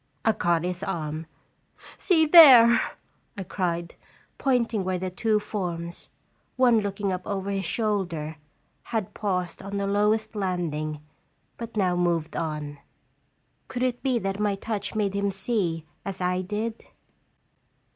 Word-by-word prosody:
I 220 - +5
caught 170 -5 +1
his 180 0 -3
arm. 160 -4 -4 0.7
"See 325 -4 +3
there!" 265 -8 +9 0.6
I 195 - -3
cried, 170 -2 -2 0.5
pointing 235 -6 +1
where 185 0 -1
the 185 +1 -4
two 215 +3 +1
forms 175 -5 -5 0.5
one 245 -3 +4
looking 200 -1 -2
up 180 - -3
over 200 -1 -2
his 195 -1 -2
shoulder 175 -7 -2 0.5
had 220 -5 -3
paused 180 -4 -2
on 200 +1 -5
the 200 - -1
lowest 210 +2 +1
landing, 160 -6 -2 0.5
but 230 -1 -8
now 185 -3 +2
moved 170 -3 0
on. 150 -3 -4 0.9
Could 250 0 -3
it 250 -1 -1
be 260 -3 +1
that 195 -2 -3
my 205 -1 +1
touch 205 0 -4
made 205 -2 0
him 200 0 0
see 190 -5 -1 0.2
as 195 -1 -5
I 180 0 0
did 215 +4 -4
195 Hz, 135 wpm, -26 LUFS, 175-220 Hz, 0.9 s, there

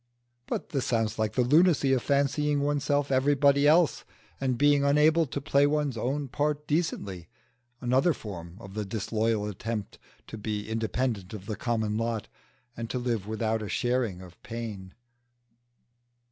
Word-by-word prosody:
But - - -3
this 140 -6 -2
sounds 115 -2 0
like 110 -1 0
the 125 - +2
lunacy 150 0 +4
of 130 - +2
fancying 145 +1 +1
oneself 145 0 0
everybody 140 +1 +4
else 160 +1 +4 0.4
and 130 -2 0
being 145 0 +4
unable 150 +3 +4
to 135 - -4
play 140 +1 +3
one's 145 -3 0
own 135 +5 -2
part 145 +2 -1
decently 105 - -2 0.5
another 130 +7 +3
form 90 - -7
of 95 -3 -11
the 105 0 -2
disloyal 110 +1 -1
attempt 105 +1 -5 0.3
to 110 - -8
be 105 -1 -3
independent 110 -2 -2
of 95 -2 -9
the 105 0 -3
common 110 -1 -1
lot, 115 -2 -2 0.5
and 115 0 -5
to - - -2
live 120 -5 -2
without 110 0 -1
a 105 - -5
sharing 120 -7 0
of 90 -1 -15
pain. 105 -5 -7
120 Hz, 150 wpm, -28 LUFS, 110-145 Hz, 0.5 s, lunacy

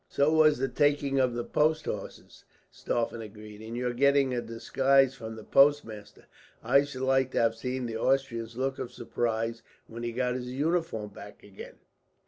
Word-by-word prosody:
"So 140 +2 +2
was 155 -2 +5
the 135 +2 0
taking 140 +1 +1
of 125 -2 +1
the 120 - -2
post 155 +4 +1
horses," 100 - -7 0.3
Stauffen 115 -1 -2
agreed, 105 0 -11
"and 115 +2 -7
your 125 0 -1
getting 140 +1 +3
a 120 - -1
disguise 135 +3 +2
from 110 -4 -8
the 110 - -10
postmaster. 135 -8 +2 0.4
I 140 +5 +4
should 130 -2 -6
like 130 0 +2
to - - +1
have 115 -1 +3
seen 125 +2 -4
the 115 -1 -4
Austrian's 120 -3 -1
look 135 +1 -2
of 120 - -5
surprise, 115 -1 -2 0.2
when 115 +1 -9
he 120 0 -3
got 125 +1 -1
his 125 -1 -5
uniform 150 -7 -1
back 100 0 -13
again. 100 -1 -11
125 Hz, 175 wpm, -28 LUFS, 115-135 Hz, 0.4 s, was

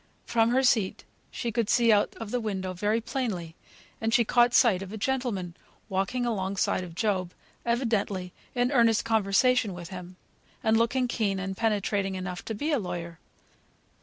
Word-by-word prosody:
From 230 -1 +2
her 260 +2 +2
seat 220 -7 +2 0.3
she 235 - -3
could 225 -1 -1
see 235 -2 +4
out 205 -1 +2
of 225 -2 -7
the 250 - 0
window 190 -4 -3
pretty 210 +5 0
plainly, 210 -10 -3 0.5
and 225 0 0
she 235 0 +4
caught 240 +2 +4
sight 210 -7 +5
of 195 0 -7
a 220 - -5
gentleman 220 -8 -2 0.3
walking 195 +6 -1
alongside 195 -4 0
of 170 -2 -9
Job, 190 -3 -1 0.3
evidently 210 -6 0 0.2
in 245 0 +1
earnest 230 -5 +3
conversation 220 0 +2
with 175 -1 -8
him, 180 -1 -8 0.5
and 220 0 +3
looking 240 +3 +2
keen 210 -5 0
and 190 0 -3
penetrating 200 -2 0
enough 180 -1 -5
to 225 - -4
be 295 +9 -2
a 290 - +2
lawyer. 175 -3 -5
215 Hz, 165 wpm, -27 LUFS, 190-235 Hz, 0.5 s, sight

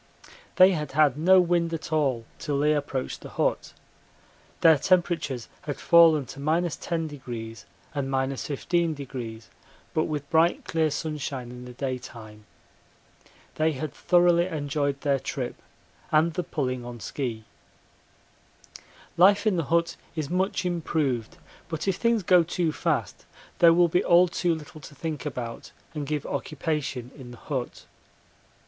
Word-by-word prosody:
They 185 +1 +7
had 150 -6 -3
had 145 -3 +4
no 185 +5 +5
wind 175 -1 +2
at 160 0 -6
all 135 -7 +1
till 145 -2 -2
they 150 +2 +3
approached 140 -3 -3
the - - -9
hut. - - -1 0.9
Their 160 -3 +6
temperatures 165 -8 +1
had 145 -2 -5
fallen 165 -4 +5
to 135 - -10
10° 145 - -3 0.3
and 140 -2 -2
15°, 135 -3 -2 0.5
but 155 - +2
with 145 -2 -4
bright 165 +1 +3
clear 160 -1 +1
sunshine 140 -5 -4
in 125 0 -9
the 125 - -9
daytime. 120 -5 -6 1.1
They 155 0 +1
had 140 +1 -5
thoroughly 175 0 +3
enjoyed 145 -3 -2
their 140 -2 +1
trip 125 -1 -5 0.5
and 160 +2 +3
the 180 - -1
pulling 130 -7 -3
on 120 0 -8
ski. 115 -3 -4 1.7
Life 200 +5 +5
in 210 -3 +3
the 165 -3 -1
hut 170 +3 +1 0.2
is 155 -2 -3
much 185 0 0
improved, 155 -9 -1 0.3
but 160 +2 -4
if 190 -2 +1
things 230 -3 +1
go 180 0 +6
too 170 0 -1
fast - - -2 0.3
there 170 -1 +8
will 175 +1 +5
be 175 +2 +1
all 175 +1 +5
too 170 0 0
little 155 0 -11
to 145 - -12
think 155 0 -4
about 120 -4 -6 0.2
and 150 -3 -4
give 150 -1 -2
occupation 145 -5 -3
in 130 -4 -11
the 120 - -11
hut. 130 -1 -5
150 Hz, 140 wpm, -26 LUFS, 135-170 Hz, 1.7 s, there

